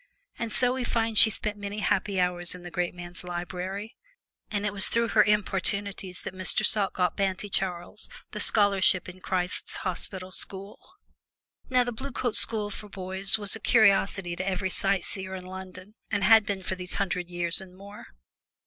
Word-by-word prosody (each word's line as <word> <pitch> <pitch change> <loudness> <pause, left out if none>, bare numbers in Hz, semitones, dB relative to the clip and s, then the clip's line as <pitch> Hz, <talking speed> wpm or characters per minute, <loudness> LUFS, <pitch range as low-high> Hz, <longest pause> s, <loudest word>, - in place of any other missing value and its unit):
And 230 -2 -3
so 250 +2 +1
we 260 -1 -3
find 230 -2 -1
she 220 - +9
spent 210 0 -3
many 205 0 -5
happy 205 -2 0
hours 180 -1 +2
in 180 - -11
the 175 - -9
great 175 0 -2
man's 175 +1 -9
library; 180 +5 -5 0.5
and 205 0 -2
it 205 - -1
was 195 -1 +3
through 230 0 0
her 210 - +5
importunities 200 -2 0
that - - -6
Mr. 185 -1 +1
Salt 200 -3 +3
got 180 -2 0
banty 195 +1 -2
Charles 180 +2 -3 0.2
the - - -6
scholarship 195 -3 +4
in 185 0 -10
Christ's 180 -1 -2
Hospital 185 0 -1
School. 195 +2 -7 0.9
Now 250 -1 +3
the 245 - -3
Blue 265 +4 -6
Coat 240 -2 -2 0.6
boys 190 +2 0
are 210 - -9
a 220 - -3
curiosity 195 -5 +3
to 185 +2 -4
every 190 0 -2
sight 195 -2 +3
seer 190 -1 -4
in 185 -1 -8
London 185 +1 -10 0.2
and 205 -2 -1
have 220 +1 +6
been 195 -2 -3
for 190 - -3
these 180 -1 -4
hundred 180 -2 -2
years 175 0 -1
and 185 -1 -13
more. 200 +2 -12
190 Hz, 175 wpm, -27 LUFS, 185-210 Hz, 0.9 s, she